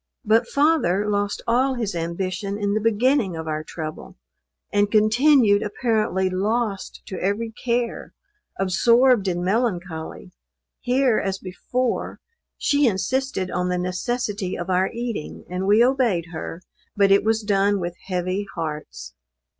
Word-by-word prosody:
But 225 +2 +3
father 280 - +2
lost 205 0 -1
all 255 +3 +2
his 225 -4 -2
ambition 185 +4 -3
in 205 -1 -1
the 215 - 0
beginning 230 -2 +2
of 160 0 -6
our 155 0 -2
trouble, 155 -1 -7 0.6
and 205 0 +3
continued 215 +1 +4
apparently 215 -3 0
lost 200 +2 -2
to 190 -3 -6
every 210 +4 -1
care 235 +1 -3 0.4
absorbed 230 +4 +3
in 175 -1 -1
melancholy. 185 -5 -2 0.5
Here, 250 -2 +2
as 195 0 -2
before, 235 +7 -3 0.4
she 285 -1 +2
insisted 230 -1 -1
on 180 0 -1
the 180 - 0
necessity 195 +2 -2
of 175 +2 -4
our 185 +1 +2
eating; 235 -8 -5
and 185 +1 -2
we 210 +3 +6
obeyed 235 -10 +1
her, 165 +2 -6 0.3
but 200 -1 +4
it 195 - +5
was 220 0 +1
done 200 -1 +2
with 175 -1 -3
heavy 185 +2 -2
hearts. 150 - -6
205 Hz, 135 wpm, -23 LUFS, 185-235 Hz, 0.6 s, we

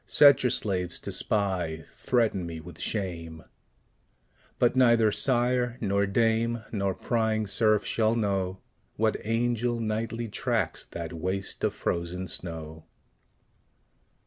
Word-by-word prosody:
Set 145 -2 +7
your 125 - +2
slaves 90 -6 -1
to - - -6
spy; 90 -6 0
threaten 115 -7 +1
me 85 -1 -6
with 80 0 -12
shame: 85 -6 -3 1.1
But 120 +1 +2
neither 115 -4 +5
sire 125 0 +2
nor 100 -1 +1
dame, 115 +2 +1
nor 100 -3 -1
prying 110 -2 0
serf 110 +1 +2
shall 110 0 +1
know, 95 -4 -1 0.3
What 110 0 +1
angel 120 +1 0
nightly 115 +1 -2
tracks 105 - -1
that 85 -1 -6
waste 95 +4 -3
of - - +1
frozen 90 +2 -3
snow. 80 -3 -6
105 Hz, 120 wpm, -27 LUFS, 90-115 Hz, 1.1 s, Set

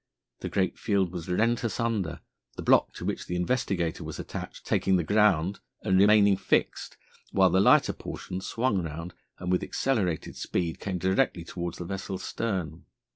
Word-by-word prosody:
The - - -4
great 95 -2 0
field 95 -4 +1
was 90 -1 -6
rent 115 +7 +1
asunder, 110 -7 -1 0.4
the - - -5
block - - +4
to - - -6
which - - -3
the 90 - -3
Investigator 90 -4 -1
was - - -6
attached - - -7
taking 95 - +2
the 90 - +2
ground 100 -1 +2 0.2
and 95 - +2
remaining 100 -1 +6
fixed, - - 0 0.4
while 95 -2 +5
the 95 - +4
lighter 100 - +5
portion 90 +1 -6
swung 115 -2 0
round 85 +1 -6 0.2
and, 90 0 -3
with 90 - +2
accelerated 100 - -1
speed, 85 -2 -2
came 95 -2 -3
directly 95 0 +1
towards 85 0 -5
the 90 - -6
vessel's 95 +1 -5
stern. 90 -8 -3
95 Hz, 165 wpm, -28 LUFS, 85-105 Hz, 0.4 s, remaining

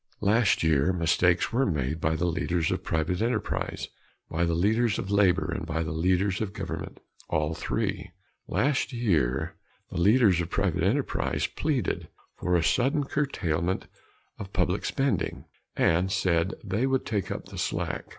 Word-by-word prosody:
Last 105 -2 +3
year 80 +1 +3
mistakes 90 +2 +2
were 130 +3 +3
made 75 -2 -1
by 80 +1 +1
the 80 +2 0
leaders 85 -1 0
of - - -2
private 80 +4 -1
enterprise, 115 -2 -1 0.4
by 85 +2 +1
the 85 -1 0
leaders 110 +5 +2
of 95 - -4
labor 95 -2 +3
and - - -4
by 80 +2 -2
the 80 - -4
leaders 90 +5 +1
of 100 -2 -3
government - - -6 0.3
all 75 +1 0
three. 80 - -2 0.4
Last 140 0 +1
year 80 - 0 0.3
the - - -3
leaders 100 -2 +5
of 85 - -4
private 100 -4 0
enterprise - - 0
pleaded 140 - -1 0.3
for 90 0 0
a 85 - +3
sudden 135 - +2
curtailment 95 - -1 0.5
of 95 -1 -7
public 90 0 0
spending, 135 - -1 0.3
and 90 +3 +2
said 85 0 +1
they 105 +7 0
would 130 -1 0
take 105 -5 -2
up - - -5
the - - -7
slack. - - -2
90 Hz, 155 wpm, -27 LUFS, 85-110 Hz, 0.5 s, leaders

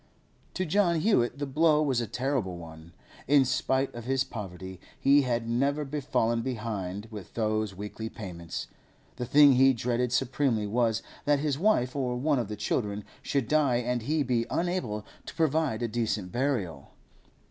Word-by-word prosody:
To 185 - -1
John 170 -2 +2
Hewett 135 - +2
the 145 - -2
blow 150 +2 +3
was 130 -5 +1
a 115 - -3
terrible 125 -7 -2
one. 80 -1 -11 0.4
In 140 0 +5
spite 130 +1 0
of 120 -1 -8
his 130 0 +1
poverty, 95 -4 -8 0.2
he 140 +1 +5
had 120 -3 -1
never 140 +5 0 0.2
fallen 115 -2 +1
behind 105 -5 -4
with 105 -5 -9
those 110 -3 0
weekly 105 +3 -6
payments. 85 -7 -6 0.5
The 125 -1 -4
thing 145 0 +7
he 135 +1 +5
dreaded 120 +1 -1
supremely 125 -3 +1
was, 115 +1 +1 0.2
that 145 0 +4
his 145 -1 -1
wife 150 - +2
or 125 -3 -1
one 140 +2 +1
of 115 - -2
the 105 - -5
children 105 0 -2 0.2
should 135 -5 -1
die 150 -5 +3
and 125 0 -1
he 150 +6 0
be 120 -3 0
unable 170 - -2 0.2
to - - -8
provide 155 -7 +1
a - - +1
decent 110 -5 -2
burial. 110 - -2
125 Hz, 165 wpm, -28 LUFS, 110-140 Hz, 0.5 s, thing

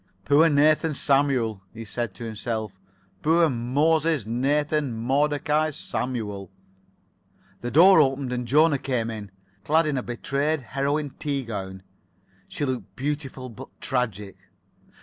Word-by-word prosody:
"Poor 150 +4 +5
Nathan 155 +1 +3
Samuel!" 135 -8 +1
he 115 - -7
said 115 -1 -4
to 120 - -8
himself. 110 -3 -4 0.4
"Poor 165 0 +3
Moses 145 +3 +1
Nathan 145 +4 0
Modecai 145 +5 +1
Samuel!" 105 - -4 1.1
The 120 - -3
door 180 +7 +7
opened 135 -2 0
and 125 -1 -3
Jona 150 +2 +4
came 125 -4 -2
in, 105 -3 -7 0.3
clad 160 +6 +3
in 150 -3 -1
a - - 0
betrayed 140 +5 -2
heroine 140 +5 -2
tea 140 -3 -2
gown. 95 -4 -6 0.6
She 145 - -3
looked 125 -7 -4
beautiful 135 -2 -4
but 125 +2 -10
tragic. 105 -7 -2
135 Hz, 125 wpm, -25 LUFS, 115-150 Hz, 1.1 s, door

